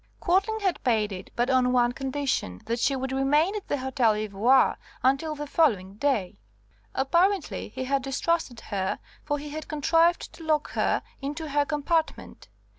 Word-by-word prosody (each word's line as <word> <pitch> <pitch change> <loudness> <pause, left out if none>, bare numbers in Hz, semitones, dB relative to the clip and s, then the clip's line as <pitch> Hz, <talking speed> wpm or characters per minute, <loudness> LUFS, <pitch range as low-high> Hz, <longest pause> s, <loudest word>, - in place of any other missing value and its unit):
Quadling 400 +5 +1
had 380 -3 -1
paid 215 -4 +1
it, 185 -1 -7
but 240 +2 +1
on 255 -1 +3
one 245 -1 +3
condition, 265 - -2
that 235 +1 -2
she 275 - +2
would 265 0 -3
remain 295 +8 +2
at 415 - -5
the 290 - 0
Hotel 255 -4 +2
Ivoire 215 +5 +3 0.3
until 275 +4 +2
the 295 0 -5
following 210 - +1
day. 220 -8 0 0.6
Apparently 340 - +1
he 260 +4 -5
had 275 +1 0
distrusted 275 -1 -1
her, 190 -2 -2 0.3
for 290 - -1
he 295 +1 -7
had 310 +1 -6
contrived 330 +3 +2
to 330 - -12
lock 310 -2 0
her - - 0 0.2
into 295 +3 -4
her 290 0 +2
compartment. 310 +2 -2
275 Hz, 165 wpm, -26 LUFS, 245-315 Hz, 0.6 s, on